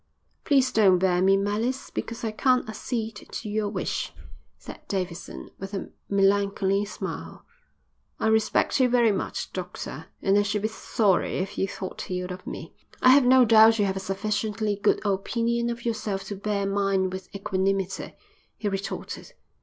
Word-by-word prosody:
"Please 270 Hz, -3 st, +3 dB
don't 195 Hz, -4 st, +5 dB
bear 180 Hz, -1 st, +2 dB
me 195 Hz, +1 st, +5 dB
malice 215 Hz, +6 st, -1 dB
because 230 Hz, 0 st, -5 dB
I 225 Hz, -, -1 dB
can't 255 Hz, +3 st, +2 dB
accede 220 Hz, 0 st, -4 dB
to 215 Hz, -, -7 dB
your 210 Hz, 0 st, -1 dB
wish," -, -, -3 dB, 0.5 s
said -, -, -10 dB
Davidson, 180 Hz, -3 st, -4 dB
with 195 Hz, +1 st, -6 dB
a 195 Hz, -, -5 dB, 0.2 s
melancholy 200 Hz, 0 st, +2 dB
smile. 205 Hz, -, -7 dB, 0.7 s
"I -, -, -1 dB
respect 220 Hz, +4 st, +2 dB
you 255 Hz, -1 st, +4 dB
very 240 Hz, -2 st, +4 dB
much, 195 Hz, -, -3 dB
doctor, 175 Hz, -4 st, -6 dB, 0.2 s
and 195 Hz, +1 st, +4 dB
I -, -, +5 dB
should 205 Hz, 0 st, -1 dB
be 215 Hz, -, +1 dB
sorry 210 Hz, -3 st, +1 dB
if 190 Hz, +1 st, -3 dB
you 195 Hz, -, 0 dB
thought 190 Hz, 0 st, -6 dB
ill 180 Hz, 0 st, -3 dB
of 185 Hz, -, -11 dB
me." -, -, -7 dB, 0.3 s
"I 255 Hz, -, +5 dB
have 265 Hz, 0 st, +7 dB
no 255 Hz, 0 st, +7 dB
doubt 225 Hz, 0 st, +7 dB
you 205 Hz, -, +2 dB
have 190 Hz, -1 st, -1 dB
a -, -, -2 dB
sufficiently 210 Hz, +2 st, -1 dB
good 205 Hz, +1 st, +1 dB
opinion 235 Hz, +4 st, 0 dB
of 235 Hz, 0 st, -5 dB
yourself 215 Hz, -4 st, -2 dB
to 205 Hz, -, -3 dB
bear 200 Hz, 0 st, -1 dB
mine 195 Hz, -1 st, +1 dB
with 185 Hz, 0 st, -7 dB
equanimity," 195 Hz, -1 st, -1 dB, 0.4 s
he 210 Hz, -, -3 dB
retorted. 195 Hz, 0 st, -5 dB
205 Hz, 165 wpm, -26 LUFS, 195-220 Hz, 0.7 s, have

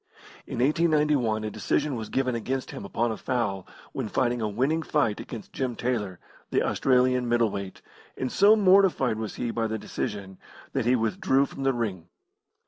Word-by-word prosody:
In -, -, -5 dB
1891 150 Hz, -6 st, +2 dB
a 110 Hz, -, -3 dB
decision 145 Hz, +6 st, -1 dB
was 110 Hz, -2 st, -5 dB
given 130 Hz, -1 st, 0 dB
against 130 Hz, +3 st, -3 dB
him -, -, -7 dB
upon 115 Hz, +4 st, -1 dB
a 110 Hz, -, -4 dB
foul 115 Hz, -7 st, -2 dB, 0.3 s
when 110 Hz, -, -3 dB
fighting 120 Hz, 0 st, 0 dB
a 110 Hz, -, 0 dB
winning 135 Hz, +10 st, 0 dB
fight 145 Hz, -10 st, 0 dB
against 115 Hz, -3 st, -8 dB
Jim 130 Hz, -3 st, -2 dB
Taylor, 110 Hz, -8 st, -2 dB, 0.3 s
the -, -, +1 dB
Australian 125 Hz, -1 st, +2 dB
middle 120 Hz, -2 st, +2 dB
weight, 100 Hz, -1 st, -6 dB, 0.3 s
and 130 Hz, -, -2 dB
so 205 Hz, +2 st, +6 dB
mortified 185 Hz, -, +4 dB
was 110 Hz, -2 st, -5 dB
he 120 Hz, -1 st, -2 dB
by 115 Hz, -1 st, -1 dB
the 110 Hz, 0 st, -2 dB
decision, 100 Hz, -2 st, -5 dB, 0.3 s
that -, -, 0 dB
he 125 Hz, +1 st, +4 dB
withdrew 125 Hz, +4 st, +2 dB
from 135 Hz, -, -9 dB
the 135 Hz, 0 st, +2 dB
ring. 95 Hz, -8 st, -3 dB
120 Hz, 175 wpm, -26 LUFS, 110-135 Hz, 0.3 s, so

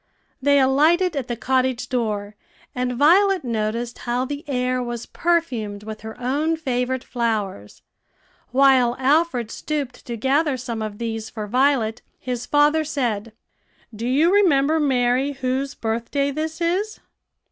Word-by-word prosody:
They 285 Hz, +1 st, +4 dB
alighted 315 Hz, +7 st, +3 dB
at 270 Hz, -3 st, -3 dB
the 240 Hz, -, -2 dB
cottage 255 Hz, 0 st, 0 dB
door, 210 Hz, -4 st, -2 dB, 0.4 s
and 250 Hz, 0 st, -1 dB
Violet 365 Hz, +7 st, +4 dB
noticed 230 Hz, 0 st, -2 dB
how 245 Hz, +1 st, -1 dB
the 285 Hz, +2 st, -5 dB
air 255 Hz, -1 st, 0 dB
was 240 Hz, -1 st, -5 dB
perfumed 245 Hz, -13 st, -1 dB
with 215 Hz, 0 st, -7 dB
her 220 Hz, +2 st, -9 dB
own 295 Hz, +6 st, 0 dB
favorite 255 Hz, -3 st, -1 dB
flowers. 210 Hz, -, -3 dB, 0.7 s
While 260 Hz, -2 st, +4 dB
Alfred 265 Hz, -4 st, +1 dB
stooped 285 Hz, -5 st, -4 dB
to 235 Hz, -1 st, -4 dB
gather 275 Hz, +4 st, +1 dB
some 235 Hz, -3 st, -5 dB
of 215 Hz, -1 st, -5 dB
these 225 Hz, -1 st, -4 dB
for 215 Hz, -2 st, -5 dB
Violet, 245 Hz, -1 st, +1 dB, 0.2 s
his 250 Hz, -2 st, -5 dB
father 295 Hz, +2 st, +3 dB
said, 235 Hz, -8 st, -2 dB, 0.6 s
"Do 230 Hz, +3 st, -4 dB
you 305 Hz, +8 st, +3 dB
remember, 320 Hz, -6 st, +4 dB
Mary, 260 Hz, -1 st, +1 dB
whose 265 Hz, +1 st, -2 dB
birthday 235 Hz, +5 st, -1 dB
this 315 Hz, +3 st, -4 dB
is?" 375 Hz, +6 st, -1 dB
255 Hz, 135 wpm, -22 LUFS, 235-290 Hz, 0.7 s, They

